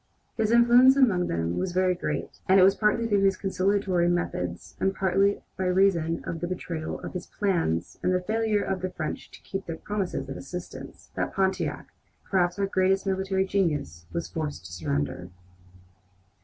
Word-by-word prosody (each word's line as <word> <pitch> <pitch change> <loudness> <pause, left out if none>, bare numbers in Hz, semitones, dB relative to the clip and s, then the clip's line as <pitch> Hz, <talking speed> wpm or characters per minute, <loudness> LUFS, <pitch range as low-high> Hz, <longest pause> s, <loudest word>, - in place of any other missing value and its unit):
His 215 - +1
influence 240 +3 +6
among 210 -10 +3
them 85 0 -1
was 185 -1 -2
very 185 0 +3
great; 175 - -4
and 190 +1 +7
it - - +7
was 195 +1 +6
partly 210 +3 +1
through 205 -3 +2
his 195 -1 +3
conciliatory 190 -2 +1
methods, 90 - -3
and 195 0 +1
partly 195 +1 +2 0.2
by 190 - 0
reason 180 -3 +2
of 165 - -4
the 175 - -3
betrayal 170 -3 -4
of - - -7
his 180 - -5
plans 170 - -1
and - - +1
the 180 - +2
failure 215 +2 0
of 190 -1 -2
the 185 - -2
French 155 -4 -5
to - - -14
keep 195 0 -5
their 165 -1 -4
promises 195 -9 -3
of 135 - -6
assistance, 180 +6 -9
that - - -3
Pontiac, 190 -1 -1 0.4
perhaps 180 -2 +1
our 200 - +1
greatest 190 0 +1
military 190 0 0
genius, 150 - -1
was 170 - -3
forced 150 - -5
to 85 - -9
surrender. 85 +1 -3
185 Hz, 175 wpm, -27 LUFS, 165-195 Hz, 0.4 s, and